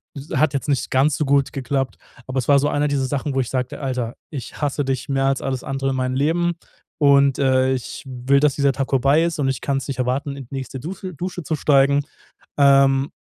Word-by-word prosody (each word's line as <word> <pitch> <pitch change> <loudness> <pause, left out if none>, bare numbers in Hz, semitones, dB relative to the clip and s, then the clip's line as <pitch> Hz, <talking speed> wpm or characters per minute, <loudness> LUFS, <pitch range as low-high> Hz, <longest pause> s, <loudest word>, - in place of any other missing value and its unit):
s 140 +2 -9
hat 155 -1 +2
jetzt 140 - -2
nicht 140 -3 0
ganz 135 +2 +3
so 150 - 0
gut 140 0 +2
geklappt. 135 0 -2 0.3
Aber 130 0 -2
es 125 - -3
war 140 -1 +6
so 145 - +1
eine 145 +1 +1
dieser 140 -2 0
Sachen, 140 +1 -2
wo 135 - +1
ich 125 - -4
sagte: 130 -1 -3
„Alter, 125 -3 -3 0.2
ich 135 -6 -7
hasse 145 0 0
dich 130 -1 -2
mehr 135 0 +1
als 135 -1 0
alles 130 -2 -3
andere 135 0 -2
in 130 - -2
meinem 130 0 -1
Leben. 170 +5 +1 0.5
Und, 140 -2 +4
äh, 130 -1 +3
ich 130 +3 -5
will, 130 +2 +1
dass 145 -2 +2
dieser 140 -1 +2
Tag 135 -1 -3
vorbei 140 +4 +3
ist 170 -1 -1
und 135 -2 +1
ich 135 - -2
kann's 135 -1 -2
nicht 135 - -3
erwarten, 135 +3 -1
in 135 - -8
die 130 - -15
nächste 130 0 -5
Duse 185 +6 -7
Dusche 180 +1 -5
zu 155 - -2
steigen." 140 -1 +3 0.5
Ähm, 135 0 +4
135 Hz, 230 wpm, -21 LUFS, 130-145 Hz, 0.5 s, war